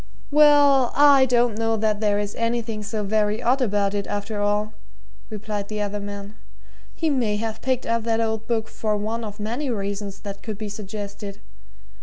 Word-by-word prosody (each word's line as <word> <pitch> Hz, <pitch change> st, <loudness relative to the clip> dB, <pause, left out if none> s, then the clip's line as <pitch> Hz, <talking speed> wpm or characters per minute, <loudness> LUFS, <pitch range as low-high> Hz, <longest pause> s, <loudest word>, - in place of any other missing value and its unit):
"Well, 285 Hz, -3 st, +6 dB
I 280 Hz, -2 st, +7 dB
don't 240 Hz, -3 st, +2 dB
know 225 Hz, 0 st, +1 dB
that 215 Hz, -1 st, +1 dB
there 210 Hz, -1 st, +2 dB
is 205 Hz, 0 st, -2 dB
anything 230 Hz, -2 st, -2 dB
so 210 Hz, 0 st, -3 dB
very 210 Hz, +1 st, +1 dB
odd 250 Hz, +3 st, +2 dB
about 205 Hz, -4 st, +1 dB
it, 200 Hz, -1 st, -2 dB
after 205 Hz, +1 st, -3 dB
all," 210 Hz, +1 st, 0 dB, 0.6 s
replied 210 Hz, -1 st, -4 dB
the 215 Hz, 0 st, -4 dB
other 205 Hz, 0 st, -2 dB
man. 200 Hz, 0 st, -7 dB, 0.6 s
"He 320 Hz, -2 st, 0 dB
may 235 Hz, -7 st, +1 dB
have 220 Hz, +1 st, -4 dB
picked 260 Hz, -1 st, 0 dB
up 230 Hz, 0 st, +1 dB
that 225 Hz, -1 st, +1 dB
old 220 Hz, -1 st, -1 dB
book 225 Hz, -2 st, 0 dB
for 215 Hz, -1 st, -1 dB
one 220 Hz, +3 st, -3 dB
of 210 Hz, -1 st, -7 dB
many 240 Hz, +7 st, -2 dB
reasons 200 Hz, -2 st, -4 dB
that 200 Hz, -1 st, -7 dB
could 215 Hz, -2 st, -5 dB
be 215 Hz, -1 st, -5 dB
suggested. 205 Hz, -1 st, -7 dB
215 Hz, 180 wpm, -23 LUFS, 205-230 Hz, 0.6 s, I